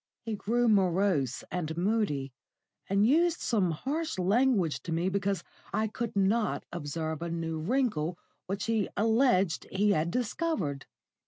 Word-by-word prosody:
He 225 -1 -3
grew 235 +4 +1
morose 185 - +2
and 160 -3 -3
moody, 175 - 0 0.6
and 200 +2 +3
used 335 +7 +3
some 205 -7 +1
harsh 290 - -2
language 195 - +2
to 170 - -6
me 170 +3 +1
because 200 0 -1 0.3
I 220 0 +1
could 230 +1 -4
not 205 +3 +1
observe 160 -1 -4
a 170 - -3
new 165 -1 -3
wrinkle 180 - 0 0.3
which 195 +1 -2
he 225 -3 0
alleged 220 -5 +2
he 205 +2 +2
had 160 -2 +1
discovered. 210 - -2
195 Hz, 140 wpm, -29 LUFS, 165-225 Hz, 0.6 s, and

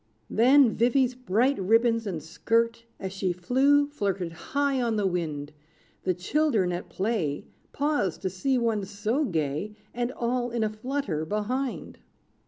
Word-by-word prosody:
Then 255 +1 +5
Vivy's 250 +2 +3
bright 250 +2 +1
ribbons 225 +3 +3
and 165 -6 -4
skirt, 230 +7 0
As 190 -1 -5
she 190 -1 -1
flew, 265 +11 +3
flirted 195 - -2
high 280 - -1
on 230 -2 0
the 210 -2 0
wind; 155 -5 -2 0.5
The 185 -1 +1
children 210 - +1
at 175 +1 -5
play, 190 -8 -1 0.3
Paused 285 - -1
to 190 - 0
see 255 +9 0
one 225 -4 0
so 210 +8 -1
gay, 160 - -2 0.2
And 240 +1 -1
all 245 0 -1
in 235 -1 -1
a 215 - +1
flutter 215 - -2
behind. 230 +9 -3
225 Hz, 145 wpm, -27 LUFS, 185-255 Hz, 0.5 s, Then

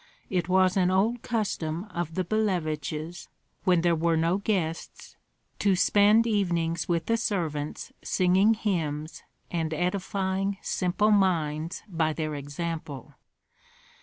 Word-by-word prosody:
It 180 -2 0
was 185 0 +3
an 180 -1 +3
old 215 +6 +1
custom 185 -7 -2
of 170 -2 -3
the 185 - 0
Billeviches, 170 -5 -2 0.4
when 180 -2 +4
there 170 0 +3
were 165 0 +1
no 165 +3 +2
guests, 180 -6 -3 0.4
to 200 -2 +3
spend 210 +4 +4
evenings 175 -7 0
with 170 -1 0
the 230 - +1
servants 160 -10 -3
singing 190 +4 +3
hymns 160 -7 -2 0.3
and 165 -2 -1
edifying 190 +2 -1
simple 190 +4 +1
minds 165 -5 +1
by 160 -4 0
their 155 -1 -3
example. 145 0 -5
175 Hz, 120 wpm, -27 LUFS, 160-195 Hz, 0.4 s, when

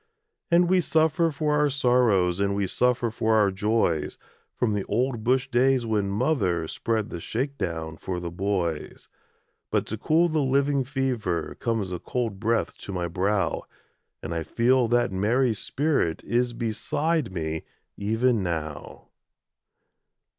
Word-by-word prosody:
And 175 +1 +4
we 185 +1 +4
suffer 160 +1 +2
for 150 0 0
our 150 0 +3
sorrows, 120 -10 +2
And 100 0 +1
we 100 0 0
suffer 120 +3 +1
for 110 0 +1
our 105 -2 +4
joys, 100 -6 0 0.4
From 110 -3 0
the 100 -1 -1
old 120 +1 -1
bush 130 +2 +2
days 125 0 +3
when 105 -3 0
mother 100 - 0
Spread 110 +4 -2
the 85 - -5
shake 135 - -3
down 80 -6 -4
for 90 -2 -4
the 85 -1 -5
boys. 90 -3 -3 0.6
But - - 0
to 110 - -5
cool 165 +7 +3
the 155 -2 0
living 140 +1 +2
fever, 125 - -2
Comes 110 -5 -1
a 90 - -3
cold 115 -4 -3
breath 115 +1 0
to - - -7
my 90 -2 -2
brow, 95 +4 0 0.6
And 80 - -4
I 85 - -2
feel 120 +7 +2
that 120 -2 +2
Mary's 110 +4 +1
spirit 140 - 0
Is 120 0 0
beside 135 - -1
me, 80 -3 -3 0.3
even 115 +2 +1
now. 80 -5 -5
115 Hz, 145 wpm, -26 LUFS, 95-130 Hz, 0.6 s, And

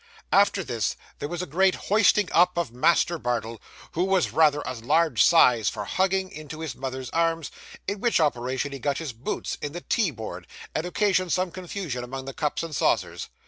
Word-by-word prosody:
After - - +4
this, - - -2 0.2
there 145 - -4
was 175 +1 -3
a - - -3
great 185 +5 +2
hoisting 210 -1 +3
up 180 +1 +4
of 170 -8 -1
Master 165 +6 +2
Bardell, 115 -3 -3 0.3
who 175 - 0
was 190 -2 +2
rather 150 -2 +4
a 130 - -3
large 150 +8 +2
size 125 - +5
for 105 -2 -5
hugging, 190 - 0
into 155 +1 -8
his 160 -6 -4
mother's 130 0 -5
arms, 165 -2 0 0.4
in 200 +1 -2
which 235 -1 +2
operation 130 -2 0
he 140 - -6
got 140 +1 -1
his 155 -6 -5
boots 115 +4 -4
in 145 - -4
the 175 - -6
tea 215 -2 +1
board, 110 -6 -8 0.3
and 160 +3 -2
occasioned 185 0 +1
some 185 +1 0
confusion 175 -8 -5
among 130 +2 -6
the 135 - -6
cups 150 0 -2
and 165 -3 -5
saucers. - - 0
160 Hz, 190 wpm, -25 LUFS, 130-180 Hz, 0.4 s, size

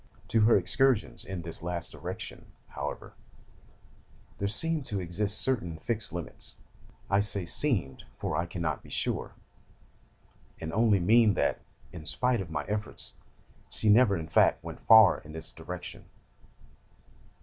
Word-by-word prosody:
To 115 - +3
her 110 +1 +6
excursions 125 +5 +2
in 95 -3 -6
this 85 0 -6
last 85 0 -3
direction, - - -8 0.2
however, - - -6 1.3
there 100 - 0
seemed 155 +10 +1
to 105 -5 -2
exist 100 +4 -1
certain 90 -11 0
fixed 110 +4 -3
limits: 85 -1 -7 0.5
I 100 - +2
say 100 -2 +1
seemed, 90 - +1
for - - -3
I 85 +1 -1
cannot 85 -2 -3
be - - -15
sure, - - -3 1.3
and 80 0 -5
only 110 -2 +3
mean 110 +3 +4
that, - - 0 0.3
in 80 -3 -6
spite 125 +6 +2
of 90 - -7
my 75 -2 -3
efforts, 105 +4 -5 0.6
she 110 - -1
never, 105 -2 +5
in 80 -1 -6
fact, 80 - +3
went - - -8
far 110 -1 +8
in 75 - -13
this 80 0 -7
direction. - - -8
100 Hz, 140 wpm, -29 LUFS, 85-110 Hz, 1.3 s, far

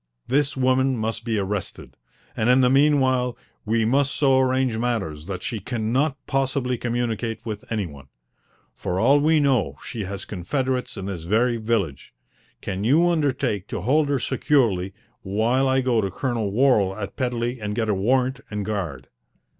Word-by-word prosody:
"This 140 +1 +1
woman 130 0 +2
must 110 +1 -2
be 115 -2 -1
arrested, 100 -1 -4 0.4
and 110 +2 +1
in 125 +1 +5
the 125 0 +4
meanwhile 130 -3 +3 0.3
we 110 +1 +1
must 140 +4 +2
so 135 -2 +4
arrange 130 -2 +1
matters 95 -11 -2
that 95 -2 -5
she 115 - -3
cannot 120 +7 -1
possibly 135 -2 0
communicate 120 -1 -2
with 105 -1 -6
any 110 -3 0
one. 70 -4 -11 0.7
For 90 +1 -3
all 135 +7 +5
we 155 +2 +3
know, 120 - +1
she 110 -4 -4
has 100 +1 -6
confederates 130 +7 -2
in 95 - -5
this 90 -5 -5
very 115 +6 +2
village. 110 -11 -2 0.5
Can 95 +1 -4
you 155 +10 +4
undertake 135 - 0
to 100 - -4
hold 145 - +2
her 140 - +2
securely 115 -8 +1 0.3
while 115 +7 +1
I 130 0 +2
go 125 -3 +2
to 100 - -1
Colonel 115 0 -2
Worral 105 -5 +3
at 100 - -5
Pedley 125 -1 -2
and 105 0 -3
get 110 -1 0
a 105 - +2
warrant 125 +6 +1
and 105 -1 -3
a - - -3
guard?" 95 -10 -4
120 Hz, 170 wpm, -23 LUFS, 105-130 Hz, 0.7 s, in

